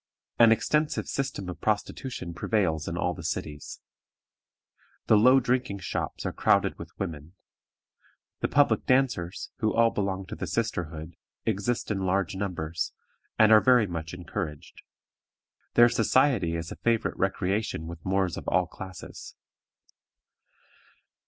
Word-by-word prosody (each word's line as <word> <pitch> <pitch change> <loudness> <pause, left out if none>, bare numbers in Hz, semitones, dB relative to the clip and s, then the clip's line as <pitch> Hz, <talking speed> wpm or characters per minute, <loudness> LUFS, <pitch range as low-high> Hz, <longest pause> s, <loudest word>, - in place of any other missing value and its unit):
An 115 -1 +8
extensive 150 +6 +1
system 135 -8 -3
of 90 - -7
prostitution 105 -2 -2
prevails 85 -4 0
in 85 - -3
all 90 0 0
the 85 - -9
cities. 75 -2 -5 1.2
The - - +5
low 125 +5 +6
drinking 125 -4 0
shops - - -4
are - - -2
crowded - - +2
with - - -8
women. 80 -3 -5 1.1
The - - 0
public 145 0 +2
dancers, 125 -9 +1
who 110 -1 +1
all 115 0 +4
belong 95 -1 -2
to - - -7
the 95 - -5
sisterhood, 85 -5 -3 0.3
exist 110 +2 -1
in 100 - -1
large 95 +1 0
numbers, 85 -4 -3 0.4
and 110 0 +6
are 110 -1 +8
very 125 -4 +5
much 85 -2 -5
encouraged. 80 -4 -6 0.9
Their 120 0 +8
society 115 - +2
is 80 0 -5
a - - -7
favorite 115 -1 0
recreation 95 -2 -1
with 85 0 -9
Moors 95 -2 0
of - - -8
all 90 -1 +2
classes. 90 0 -10
95 Hz, 135 wpm, -27 LUFS, 85-115 Hz, 1.2 s, An